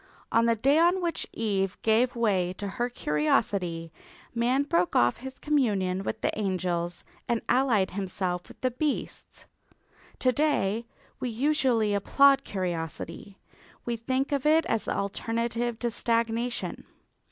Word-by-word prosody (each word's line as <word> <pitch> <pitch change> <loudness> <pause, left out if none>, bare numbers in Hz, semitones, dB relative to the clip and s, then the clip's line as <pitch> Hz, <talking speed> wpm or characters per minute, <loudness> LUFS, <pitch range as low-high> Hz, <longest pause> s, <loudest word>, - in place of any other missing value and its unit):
On 230 0 +4
the 230 - +3
day 275 +8 +3
on 350 +3 +4
which 340 -2 -2
Eve 195 -4 -1
gave 235 +3 +3
way 190 -6 +1
to 200 +2 -5
her 240 +5 -2
curiosity, 165 -1 0 0.4
man 245 +4 +2
broke 180 -11 +1
off 120 0 +4
his 265 +1 -8
communion 205 -11 +1
with 220 +2 -4
the - - 0
angels 175 -3 -2 0.2
and 235 -1 +1
allied 240 -7 +2
himself 185 -2 -3
with - - -15
the 255 - +1
beasts. 285 +4 -4 0.7
To 255 - +3
day 235 -6 0 0.3
we 250 - -2
usually 245 -4 +2
applaud 275 +7 +4
curiosity; 175 - -5 0.5
we 240 - -1
think 260 +5 -1
of 280 -2 0
it 320 +2 +4
as 225 - -1
the - - -1
alternative 230 +3 -2
to 240 0 -1
stagnation. 230 +1 -1
230 Hz, 140 wpm, -27 LUFS, 190-255 Hz, 0.7 s, On